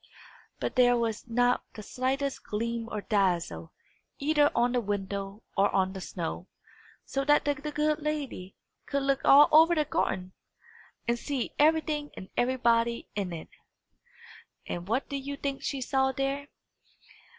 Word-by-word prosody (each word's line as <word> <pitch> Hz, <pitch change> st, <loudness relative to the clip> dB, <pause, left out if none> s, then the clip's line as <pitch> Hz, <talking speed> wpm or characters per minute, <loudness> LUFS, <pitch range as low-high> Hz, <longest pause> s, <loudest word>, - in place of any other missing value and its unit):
But -, -, -3 dB
there 245 Hz, -1 st, +5 dB
was 230 Hz, -1 st, -2 dB
not 245 Hz, +1 st, +2 dB
the 215 Hz, -, -8 dB
slightest 270 Hz, +4 st, -2 dB
gleam 230 Hz, +2 st, -3 dB
or 210 Hz, -, -3 dB
dazzle, 175 Hz, -, 0 dB, 0.5 s
either 295 Hz, 0 st, +3 dB
on 240 Hz, +1 st, +3 dB
the 245 Hz, -1 st, +1 dB
window 200 Hz, 0 st, -4 dB
or 200 Hz, 0 st, +4 dB
on 190 Hz, -1 st, +2 dB
the 190 Hz, -, -7 dB
snow; 175 Hz, 0 st, -5 dB, 0.6 s
so 275 Hz, -, -2 dB
that 295 Hz, +1 st, +3 dB
the 290 Hz, -, +2 dB
good 300 Hz, +1 st, -1 dB
lady 290 Hz, -11 st, -4 dB, 0.3 s
could 280 Hz, -1 st, -1 dB
look 275 Hz, 0 st, +1 dB
all 285 Hz, +2 st, +8 dB
over 325 Hz, +3 st, +7 dB
the 305 Hz, -2 st, +2 dB
garden, 185 Hz, -8 st, -1 dB, 0.7 s
and 235 Hz, 0 st, +1 dB
see 275 Hz, -3 st, -3 dB
everything 305 Hz, -1 st, +2 dB
and 185 Hz, -, -8 dB
everybody 235 Hz, -2 st, +1 dB
in 195 Hz, -3 st, -3 dB
it. 165 Hz, -2 st, -7 dB, 1.2 s
And 175 Hz, +1 st, -5 dB
what 235 Hz, +6 st, 0 dB
do 280 Hz, -, -3 dB
you 280 Hz, +1 st, -5 dB
think 275 Hz, -1 st, -3 dB
she 275 Hz, -2 st, -3 dB
saw 265 Hz, +1 st, +1 dB
there? 275 Hz, +2 st, -2 dB
245 Hz, 150 wpm, -29 LUFS, 205-280 Hz, 1.2 s, all